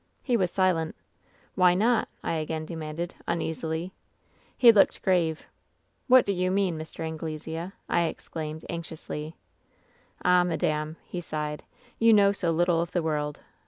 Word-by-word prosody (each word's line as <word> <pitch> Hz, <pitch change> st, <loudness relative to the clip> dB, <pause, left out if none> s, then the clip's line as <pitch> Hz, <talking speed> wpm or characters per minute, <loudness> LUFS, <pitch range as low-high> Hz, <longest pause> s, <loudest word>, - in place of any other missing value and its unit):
"He 250 Hz, -, +1 dB
was 185 Hz, -6 st, +2 dB
silent. 175 Hz, -4 st, +1 dB, 0.3 s
" -, -, -34 dB
'Why 180 Hz, -1 st, +5 dB
not 225 Hz, +5 st, +2 dB, 0.2 s
V -, -, -2 dB
I -, -, +1 dB
again 155 Hz, 0 st, -3 dB
demanded, 160 Hz, +1 st, -5 dB
uneasily. 160 Hz, +1 st, -2 dB, 0.6 s
"He 240 Hz, -2 st, +9 dB
looked 205 Hz, -3 st, +3 dB
grave. 170 Hz, -4 st, +1 dB, 0.3 s
" -, -, -44 dB
'What 255 Hz, -1 st, +7 dB
do 200 Hz, -, 0 dB
you 185 Hz, -1 st, 0 dB
mean, 190 Hz, -2 st, +1 dB
Mr. 155 Hz, +1 st, -8 dB
Anglesea 160 Hz, +1 st, -5 dB
V -, -, -11 dB, 0.2 s
I 170 Hz, -, +2 dB
exclaimed, 160 Hz, -1 st, -5 dB
anxiously. 160 Hz, -2 st, -6 dB, 0.4 s
" -, -, -27 dB
'Ah, 180 Hz, 0 st, +5 dB
madame 155 Hz, -2 st, -1 dB
!' -, -, -34 dB
he 175 Hz, -, -2 dB
sighed. 150 Hz, -2 st, -4 dB, 0.4 s
'You 230 Hz, 0 st, +6 dB
know 200 Hz, -1 st, +6 dB
so 190 Hz, -4 st, -1 dB
little 170 Hz, 0 st, +2 dB
of 170 Hz, -, -4 dB
the 175 Hz, -, +1 dB
world 150 Hz, -2 st, -2 dB
170 Hz, 165 wpm, -27 LUFS, 160-185 Hz, 0.6 s, He